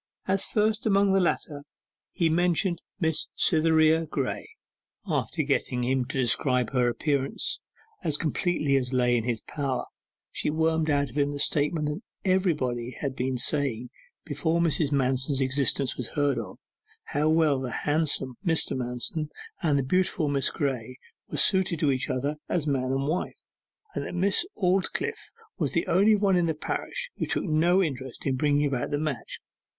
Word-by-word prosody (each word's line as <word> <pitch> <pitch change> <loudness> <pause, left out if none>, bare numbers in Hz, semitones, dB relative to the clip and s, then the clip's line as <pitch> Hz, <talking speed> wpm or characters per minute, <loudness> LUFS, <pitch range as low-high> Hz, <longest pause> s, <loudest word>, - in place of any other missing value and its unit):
As 190 0 +2
first 215 0 +1
among 200 -1 +4
the 195 - +4
latter 155 -4 -1 0.5
he 170 -3 +1
mentioned 175 +2 +1 0.2
Miss 160 -3 +1
Cytherea 160 -1 +4
Graye. - - -3 0.6
After 155 - -1
getting 135 -3 0
him 130 0 +1
to 135 - -5
describe 125 0 +1
her 125 -2 +2
appearance 140 +2 0 0.4
as 155 -4 +1
completely 155 -3 0
as 130 -1 -2
lay 125 -1 +3
in 115 -2 0
his 120 -3 -1
power, 140 -4 -3 0.5
she - - -1
wormed 160 +1 +1
out 140 -3 +1
of 145 - -3
him 145 0 +2
the 145 - -5
statement 150 +2 +1
that 150 +6 -3 0.3
everybody 130 -10 0
had 135 -3 -3
been 130 0 -1
saying 125 -3 0 0.3
before 160 +2 0
Mrs. 160 -3 +1
Manston's 135 0 +1
existence 135 0 +1
was 125 - -4
heard 145 -3 +1
of 105 -5 -7 0.5
how 150 +2 0
well 155 -4 +3
the 130 -1 -4
handsome 145 -3 +1
Mr. 165 -2 +1
Manston 130 +5 -2 0.3
and 155 -6 +2
the 140 - +1
beautiful 170 +1 +1
Miss 140 -1 +1
Graye 130 -5 -3 0.3
were - - -4
suited 190 -4 +3
for 145 - +3
each 130 -1 -2
other 140 +4 -1
as 170 -4 0
man 135 -3 0
and 135 +1 0
wife, 165 +4 -2 0.6
and - - -3
that - - -6
Miss 200 - +2
Aldclyffe 185 -1 -1 0.3
was 150 -6 -1
the 165 - +1
only 200 +5 +4
one 200 -2 +2
in 175 -1 +2
the 160 - 0
parish - - -3
who - - -2
took - - 0
no 175 +3 +3
interest 130 -5 -5
in 135 -2 +1
bringing 145 +2 +2
about 135 -4 -1
the 145 - 0
match. 150 -3 -4
150 Hz, 165 wpm, -27 LUFS, 130-165 Hz, 0.6 s, among